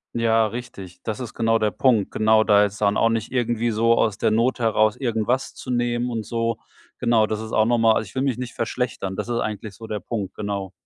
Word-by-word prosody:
Ja, 115 -1 +3
richtig. 105 -6 -8
Das 110 +1 -4
ist 120 -3 -6
genau 115 -1 +2
der 110 -1 0
Punkt. 110 0 +2
Genau, 110 0 +3
da 105 -1 +5
jetzt 105 0 -2
dann 100 0 +2
auch 115 - +3
nicht 115 0 -2
irgendwie 120 -2 0
so 115 +2 +3
aus 110 -3 +1
der - - +2
Not 115 +4 +1
heraus 110 -2 +2
irgendwas 120 0 -1
zu 125 - -7
nehmen 120 0 0
und 110 -2 -3
so. 115 +1 -2 0.4
Genau, 115 -2 +3
das 110 0 -3
ist 110 0 -7
auch 110 - +3
noch 120 0 +2
mal 115 -1 +5
also, 110 - -1
ich 95 - -14
will 130 - -1
mich 135 -3 0
nicht 125 -2 -6
verschlechtern. 115 -4 -3
Das - - -4
ist 120 -1 -1
eigentlich 105 -1 -4
so 110 +1 -10
der 105 -1 -3
Punkt, 105 -5 -5
genau. 100 -2 -4
115 Hz, 240 wpm, -23 LUFS, 105-120 Hz, 0.4 s, da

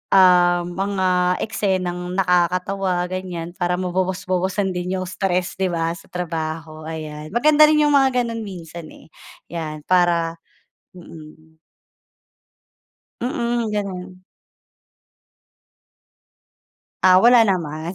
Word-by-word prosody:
um, 175 -2 +5
mga 185 -1 0
eksenang 180 -4 -2
nakakatawa, 180 0 +1
ganyan 180 -2 -5
para 180 0 -1
mabawas-bawasan 185 +1 -1
din 180 +1 -3
'yong 185 0 -3
stress, 185 -1 -2
'di 190 - +1
ba, 165 -2 -1
sa 170 0 -10
trabaho, 160 -2 -5
ayan. 155 -1 -7
Maganda 305 +4 +6
rin 300 0 +3
'yong 295 - +3
mga 265 -3 +3
gano'n 230 -1 -4
minsan, 170 -5 -9
eh, 155 - -16 0.4
'yan 155 -3 -5
para 170 -1 +1 0.6
mm. 160 -2 -14 1.6
Mm, 240 -4 -1
gano'n. 185 -3 -5 2.8
Ah, 185 0 +6
wala 240 -1 +6
naman. 165 -2 -2
180 Hz, 100 wpm, -21 LUFS, 170-195 Hz, 2.8 s, Maganda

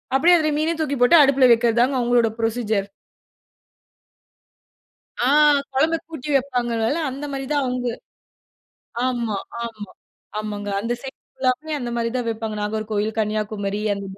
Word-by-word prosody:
அப்டியே 340 +6 +6
அதுல 310 -2 +1
மீனயும் 320 +2 -1
தூக்கி 285 -3 -1
போட்டு 245 +8 +7
அடுப்ல 275 -2 +5
வக்கிறதுதாங்க, 240 +3 +2
அவங்களோட 240 -1 +3
ப்ரொசீஜர். 220 -3 -1 2.4
ஆ! - - +2 0.5
கொழம்ப 310 +5 +2
கூட்டி 305 -3 -7
வைப்பாங்கல்ல 245 0 0
அந்த 275 +3 -6
மாரி 270 0 -4
தான் 290 -1 +1
அவுங்க. 250 -1 -2 1.2
ஆமா 240 -4 -1 0.3
ஆமா 215 -4 -7 0.5
ஆமாங்க. 205 -1 -5
அந்த 230 +3 -2
சைட் 270 -1 -8
ஃபுல்லாமே 265 +4 -1
அந்த 245 -2 -4
மாரி 230 0 -1
தான் 245 -2 -2
வெப்பாங்க. 220 -1 -4
நாகர்கோவில், 215 0 -2
கன்னியாகுமரி 210 -1 -2
அந்த, 200 0 -6
240 Hz, 125 wpm, -22 LUFS, 215-270 Hz, 2.4 s, போட்டு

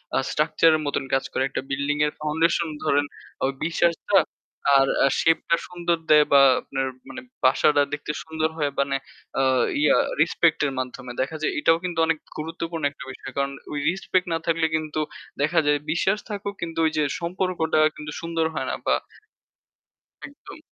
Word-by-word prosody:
আ - - +3
structure 160 +1 +3
এর - - 0
মতন 145 - -1
কাজ 135 - +2
করে। - - -1
একটা 135 - -4
বিল্ডিং 140 +2 -1
এর 150 - -1
ফাউন্ডেশন 160 +2 +1 0.2
ধরেন 145 -1 +2 0.4
আ - - +4 0.2
বিশ্বাসটা 170 0 +2 0.6
আর 135 0 +4 0.2
আ - - +5
shape 165 0 +3
টা 170 - +5
সুন্দর 175 -1 -1
দে 150 0 +8
বা 140 - +8 0.2
আপনার 135 -1 -3 0.2
মানে 260 - -7 0.2
বাসাটা 145 +3 +4
দেখতে 150 0 -3
সুন্দর 160 0 -1
হয় 145 -2 0
মানে 140 0 +1 0.4
আ - - +3 0.4
ইয়া 150 - +5 0.3
রেসপেক্ট 165 0 +3
এর 140 - 0
মাধ্যমে 125 0 -5
দেখা 135 +5 -2
যায় 155 - 0
এটাও 165 +2 +4
কিন্তু 175 -2 -3
অনেক 160 -1 +1 0.2
গুরুত্বপূর্ণ 165 +1 -5
একটা 145 - -11
বিষয়। 135 +1 -9
কারণ 140 0 0 0.2
ওই 145 - -2
রেসপেক্ট 185 0 -1
না 165 - 0
থাকলে 165 -1 +1
কিন্তু 155 -1 -2 0.4
দেখা 160 +4 +3
যায় 145 0 +3
বিশ্বাস 190 +5 +1
থাকুক 200 -1 -4
কিন্তু 165 -1 -4
ওই 160 - +2
যে 155 - +3 0.2
সম্পর্কটা 170 -2 -1 0.2
কিন্তু 150 0 -7
সুন্দর 165 -1 -1
হয় - - -3
না - - -1
বা - - +4 1.3
একদম। 285 +3 -13
160 Hz, 175 wpm, -24 LUFS, 145-170 Hz, 1.3 s, দে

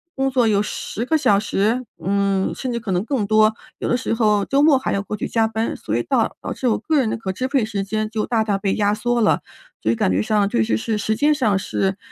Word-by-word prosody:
工 270 0 0
作 250 -3 +2
有 205 -2 +3
10 215 +1 -4
个 315 +3 +2
小 205 -9 +3
时？ 220 +4 0 0.2
嗯， 200 -1 +1
甚 255 -2 -4
至 235 - -2
可 215 -4 -5
能 180 +3 0
更 240 -4 -1
多， 215 0 +4 0.3
有 - - -2
的 245 - +3
时 235 - -2
候 210 -3 +2
周 275 +1 +2
末 295 -3 +5
还 265 - -2
要 195 - 0
过 210 - -5
去 - - -3
加 225 -1 +1
班， 220 +1 -2
所 - - -4
以 - - -1
到 - - 0
导 - - -4
致 255 - -2
我 225 - +2
个 310 +8 0
人 230 -5 +1
的 - - -2
可 195 -4 -4
支 255 +6 -2
配 265 -3 +1
时 200 -2 -3
间 215 +2 -2
就 220 -1 -2
大 225 -2 +1
大 205 -2 0
被 195 -1 -1
压 205 -1 +2
缩 240 +2 0
了。 210 - +3 0.4
所 110 - -1
以 115 - +1
感 95 - +1
觉 95 +3 +1
上 205 - +1
确 115 - +1
实 110 - 0
是 220 - -2
时 215 +1 -1
间 295 +4 +3
上 225 -9 +1
是， 190 0 -1
215 Hz, 285 characters per minute, -21 LUFS, 200-240 Hz, 0.4 s, 末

